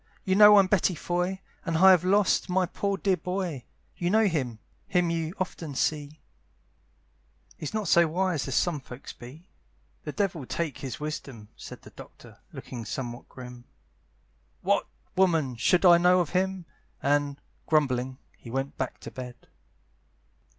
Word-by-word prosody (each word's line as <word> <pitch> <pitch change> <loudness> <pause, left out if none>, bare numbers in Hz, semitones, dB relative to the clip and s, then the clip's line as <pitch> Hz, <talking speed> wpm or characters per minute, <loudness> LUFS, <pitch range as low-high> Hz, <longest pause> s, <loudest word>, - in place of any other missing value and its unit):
you 190 - +1
know 210 +1 +8
I'm 195 - +7
Betty 185 -1 +2
Foy, 180 +4 -2 0.2
"And 165 -2 -1
I 190 +3 +8
have 180 -2 +5
lost 195 +1 +2
my 185 +1 +2
poor 200 +3 -2
dear 195 -2 +1
boy, 180 - -4 0.3
"You 175 - -1
know 220 +3 +4
him 135 - -1 0.3
him 180 -2 +1
you 165 +1 -2
often 165 -6 -4
see; 150 +1 -1 1.4
"He's 150 - -6
not 215 -3 -1
so 170 +1 +5
wise 170 -3 -1
as 135 - -2
some 170 -4 +1
folks 130 -1 -10
be," 145 +9 -13 0.6
"The - - -4
devil 175 - -2
take 165 -5 -3
his 135 -3 -6
wisdom!" 135 -8 -6
said - - -11
The - - -13
Doctor, - - -14
looking 120 -3 -8
somewhat 120 +2 -6
grim, 125 -1 -11 1.0
"What, - - +1 0.3
woman! 165 -9 +2
should 180 +10 +2
I 175 -1 +8
know 180 +1 +5
of 175 -4 -1
him?" 190 -1 -1 0.4
And, 145 0 +1 0.3
grumbling, 130 -4 +1 0.2
he 120 - -13
went 135 +3 -4
back - - -3
to - - -8
bed. 125 -1 -7
165 Hz, 155 wpm, -27 LUFS, 135-185 Hz, 1.4 s, know